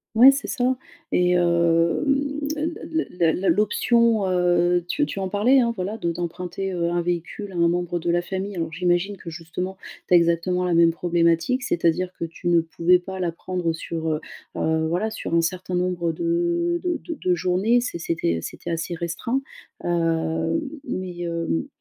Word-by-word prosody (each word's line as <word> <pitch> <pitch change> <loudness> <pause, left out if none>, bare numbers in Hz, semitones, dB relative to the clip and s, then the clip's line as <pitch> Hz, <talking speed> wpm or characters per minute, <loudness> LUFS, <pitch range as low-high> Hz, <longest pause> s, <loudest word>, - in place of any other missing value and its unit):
Ouais, 255 +5 +9
c'est 275 - -3
ça. 255 -1 +1 0.4
Et, 180 0 +3
hem, 175 - +2 0.2
la 305 - -3 0.5
la 170 -2 +2
la - - -3
la 190 - 0
l'option, 215 +2 +3
heu, 175 -1 +2
tu 295 +8 +1
tu 200 - -5
en 190 -1 -2
parlais, 220 +7 +4
hein, 235 -2 +2
voilà, 200 +3 -3
de 170 -5 -1
d'emprunter, 180 +3 -4
heu, 170 -1 0
un 175 0 0
véhicule 175 +4 -3
à - - -10
un 170 -1 +3
membre 175 0 -1
de 170 +1 -2
la 175 +1 +2
famille, 190 +2 -4
alors 165 -2 -3
j'imagine 180 +3 +1
que, 170 - -9
justement, 175 +3 -5 0.3
tu - - +1
as - - +9
exactement 170 +2 +1
la 180 - +1
même 165 0 +5
problématique, 170 +8 +1
c'est-à-dire 175 -1 +1
que - - -1
tu 165 +2 -7
ne 170 -1 +5
pouvais 165 +2 +3
pas 190 +1 -7
la 175 -2 0
prendre 175 0 -2
sur, 165 0 -4
heu 155 0 -1 0.3
heu, 160 0 +1
voilà, 185 +7 -1
sur 215 - -3
un 170 - +5
certain 180 +2 -2
nombre 180 -2 0
de 345 0 0
de 355 -2 0
de 340 - -4
de 180 -1 +2
journées, 185 +7 +2
c'est 240 -8 -4
c'était 165 - -1
c'était - - -6
assez 165 +1 -2
restreint, 175 +10 -2 0.4
heu, 165 - 0 0.2
mais, 180 -2 -4
hem, 170 - -2
175 Hz, 185 wpm, -23 LUFS, 170-195 Hz, 0.5 s, Ouais